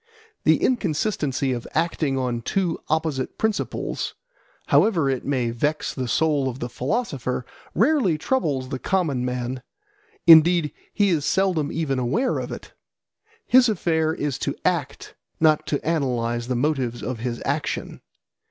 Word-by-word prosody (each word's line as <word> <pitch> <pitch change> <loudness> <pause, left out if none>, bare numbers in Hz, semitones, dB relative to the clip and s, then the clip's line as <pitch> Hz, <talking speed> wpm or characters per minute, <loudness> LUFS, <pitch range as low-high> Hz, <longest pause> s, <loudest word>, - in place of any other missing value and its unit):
The - - +5
inconsistency 155 - 0
of 120 -1 -5
acting 160 -4 0
on 125 -2 -1
two 180 - -1
opposite 155 -4 -1
principles, 220 -1 -2 0.5
however 165 -11 +3
it 130 - -2
may 125 -4 0
vex 150 +6 -1
the 130 -2 -3
soul 145 0 +1
of 125 - -6
the 120 -2 -5
philosopher, 130 - -2 0.3
rarely 260 - +3
troubles 150 - -1
the 135 -2 -4
common 155 -10 0
man; 125 0 -3 0.6
indeed 165 -1 +7 0.2
he 205 -2 +2
is 160 -5 +1
seldom 175 -3 +1
even 145 -5 -1
aware 215 - 0
of - - -5
it. - - -9 0.7
His 250 -1 +5
affair 160 -6 +1
is 145 -4 -3
to - - -2
act, - - -1 0.3
not 155 -1 +3
to 145 - 0
analyse 120 -7 0
the 125 - -1
motives 125 -3 -1
of 120 +1 -4
his 120 0 -3
action. 145 +2 -3
150 Hz, 140 wpm, -23 LUFS, 125-170 Hz, 0.7 s, indeed